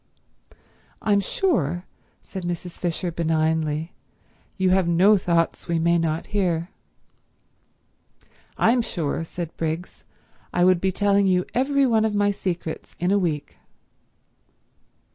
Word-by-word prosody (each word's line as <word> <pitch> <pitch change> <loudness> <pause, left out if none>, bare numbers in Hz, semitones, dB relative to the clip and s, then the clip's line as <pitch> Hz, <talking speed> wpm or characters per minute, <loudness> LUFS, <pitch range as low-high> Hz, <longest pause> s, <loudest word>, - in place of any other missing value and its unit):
"I'm 205 -2 +3
sure," 180 - 0 0.4
said 190 - -7
Mrs. 175 0 -4
Fisher 175 0 -2
benignly, 160 -1 0 0.6
"you 190 -1 +2
have 185 -2 +3
no 185 +5 +5
thoughts 170 -3 0
we 170 -1 0
may 170 +1 +3
not 160 -1 -1
hear." 175 -4 0 1.9
"I'm 240 +2 +4
sure," 165 -7 -2
said 165 0 -6
Briggs, 165 +2 -4 0.5
"I 175 - +2
would 180 -1 +4
be 190 - +1
telling 200 +1 +2
you 180 -1 +2
every 275 +2 +2
one 225 -3 +3
of 220 -1 0
my 205 0 +3
secrets 175 -5 -5
in 180 +3 +1
a 200 - +4
week." 155 -6 -3
175 Hz, 125 wpm, -24 LUFS, 165-200 Hz, 1.9 s, no